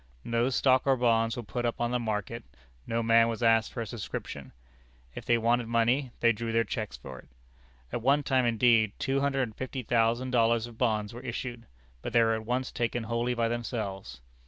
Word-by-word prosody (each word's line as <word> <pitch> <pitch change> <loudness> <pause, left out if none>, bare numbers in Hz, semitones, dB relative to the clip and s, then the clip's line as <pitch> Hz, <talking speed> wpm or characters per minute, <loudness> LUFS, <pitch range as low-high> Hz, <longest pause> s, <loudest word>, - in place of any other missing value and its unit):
No 115 +2 +1
stock 130 +1 +2
or 135 -1 +4
bonds 115 -1 +2
were 120 - -4
put 115 +4 -4
upon 120 0 -1
the 125 - 0
market; 115 +1 -3 0.4
no 115 0 -1
man 115 0 +5
was 115 +1 -3
asked 115 -1 +3
for 115 - -5
a - - -3
subscription. 110 -1 -6 0.6
If - - -8
they 120 - +3
wanted 115 +1 +1
money, 120 +4 +1
they 115 - +5
drew 115 +1 -3
their 115 0 +2
checks 105 - -5
for 65 +1 -10
it. - - -17 0.7
At 120 - -2
one 140 +4 +3
time, 130 -1 +2
indeed, 115 -2 +3
two 135 +1 0
hundred 140 -1 +1
and 110 -4 -6
fifty 130 0 -5
thousand 120 +2 +1
dollars 115 -2 +2
of 120 -1 -11
bonds 110 -4 0
were 120 - -8
issued, 120 -1 -6 0.3
but 120 - -6
they 115 -1 +5
were 115 0 +2
at 110 0 -4
once 130 +2 -1
taken 120 0 -2
wholly 120 +2 -1
by 115 -1 +1
themselves. 105 - -4
115 Hz, 205 wpm, -29 LUFS, 115-125 Hz, 0.7 s, man